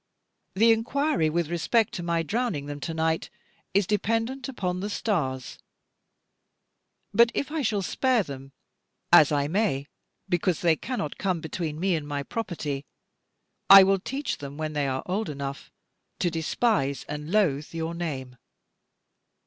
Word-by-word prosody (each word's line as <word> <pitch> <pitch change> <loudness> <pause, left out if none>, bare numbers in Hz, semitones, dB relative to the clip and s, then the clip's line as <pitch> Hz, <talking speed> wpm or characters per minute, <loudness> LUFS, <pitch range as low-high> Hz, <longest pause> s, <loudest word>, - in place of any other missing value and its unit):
The 225 +4 +5
inquiry 225 - +1
with 170 0 -1
respect 215 +6 +1
to - - -4
my 170 -1 0
drowning 190 - -1
them 145 0 -6
to 165 +3 -4
night 160 0 0 0.5
is 200 -1 +4
dependent 225 +6 -1
upon 180 -8 -2
the 205 +3 -3
stars. 135 - -2 1.5
But 235 +2 +5
if 285 +1 -2
I 315 -1 -1
shall 215 -6 0
spare 255 +2 +2
them, 135 -3 -9 0.6
as 150 - +8
I 145 -1 +1
may, 165 -6 0 0.4
because 175 -1 0
they 170 -2 +4
cannot 195 - -4
come 185 -4 0
between 160 -1 -4
me 190 +1 +1
and 150 -2 -4
my 145 -1 -3
property, 155 -8 -4 0.9
I 195 0 +12
will 195 0 +3
teach 270 +8 -4
them, 140 0 -8
when 155 -1 -3
they 145 -2 0
are 130 0 -2
old 200 +3 -2
enough, 140 -1 -6 0.5
to 175 - 0
despise 160 - 0
and 150 +2 -6
loathe 155 -9 +1
your 165 0 -3
name. 135 -7 -5
170 Hz, 150 wpm, -26 LUFS, 145-215 Hz, 1.5 s, I